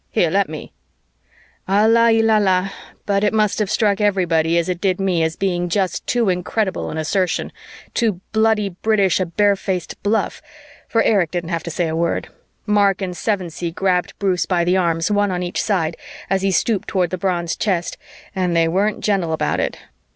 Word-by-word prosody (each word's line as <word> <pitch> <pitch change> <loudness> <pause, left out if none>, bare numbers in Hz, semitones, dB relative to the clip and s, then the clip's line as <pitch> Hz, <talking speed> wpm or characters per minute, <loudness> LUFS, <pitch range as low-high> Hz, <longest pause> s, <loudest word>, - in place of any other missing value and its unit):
Here, - - +1
let - - +1
me - - -8 0.5
" - - -34
Allah 225 +4 +4
il 225 0 +3
allah, 195 -3 +2 0.3
but 200 0 +1
it 210 +1 +1
must 215 -1 +1
have 210 -3 0
struck 210 -2 +1
everybody 170 -5 +2
as 170 - +1
it 180 -1 -3
did 190 -2 +1
me 185 -3 +1
as 160 0 0
being 175 -2 -1
just 185 0 -1
too 240 -3 +1
incredible 185 +2 -1
an 160 - -5
assertion, 175 +3 -1 0.4
too 220 -7 0
bloody 220 -2 +2
British 195 0 +1
a 185 - 0
bare 205 +4 +2
faced 190 -3 -4
bluff, 205 +1 -1 0.5
for 230 - +2
Erich 195 -7 +2
didn't 175 0 -4
have 165 -1 -1
to 170 - -6
say 170 +1 -1
a 160 - -2
word; 170 +1 -1 0.4
Mark 205 -2 +3
and 185 -3 -4
Sevensee 180 -5 -2
grabbed 180 +1 -1
Bruce 190 -3 0
by 175 -2 +1
the 180 +2 +2
arms, 170 0 +1
one 205 0 +2
on 180 -1 -2
each 175 - -2
side, 170 -6 0 0.4
as 195 -1 +2
he 195 - +1
stooped 195 +3 0
toward 180 -4 0
the 185 - -2
bronze 175 -3 -1
chest, 180 -5 -1 0.4
and 180 -2 0
they 165 -1 +3
weren't 200 +5 0
gentle 190 -6 +1
about 160 - 0
it. - - -2
190 Hz, 190 wpm, -20 LUFS, 175-205 Hz, 0.5 s, Allah